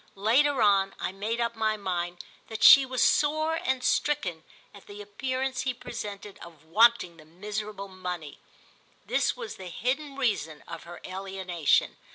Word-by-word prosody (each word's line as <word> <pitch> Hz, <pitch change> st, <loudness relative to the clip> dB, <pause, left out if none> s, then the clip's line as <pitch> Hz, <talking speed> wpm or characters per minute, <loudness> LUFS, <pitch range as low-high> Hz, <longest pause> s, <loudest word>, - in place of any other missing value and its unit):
Later 245 Hz, +6 st, +3 dB
on 195 Hz, -2 st, +3 dB
I -, -, -2 dB
made 210 Hz, +5 st, -3 dB
up 235 Hz, 0 st, -1 dB
my 220 Hz, -1 st, 0 dB
mind 175 Hz, -3 st, -3 dB, 0.2 s
that 220 Hz, -1 st, -5 dB
she 275 Hz, -2 st, +9 dB
was 255 Hz, -1 st, +1 dB
sore 310 Hz, +2 st, +2 dB
and 260 Hz, -1 st, -1 dB
stricken 250 Hz, -, 0 dB, 0.3 s
at 200 Hz, -, -15 dB
the 205 Hz, 0 st, -10 dB
appearance 255 Hz, +5 st, -3 dB
he 260 Hz, -1 st, -2 dB
presented 205 Hz, -4 st, -8 dB
of 165 Hz, -3 st, -13 dB
wanting 210 Hz, -1 st, +3 dB
the 155 Hz, -, -16 dB
miserable 205 Hz, +4 st, -6 dB
money. 180 Hz, -5 st, -7 dB, 0.7 s
This -, -, 0 dB
was 480 Hz, -3 st, -7 dB
the 185 Hz, -, -9 dB
hidden 275 Hz, -, -2 dB
reason 205 Hz, -, -2 dB
of -, -, -8 dB
her 175 Hz, 0 st, -10 dB
alienation. 185 Hz, -4 st, 0 dB
205 Hz, 155 wpm, -27 LUFS, 185-255 Hz, 0.7 s, she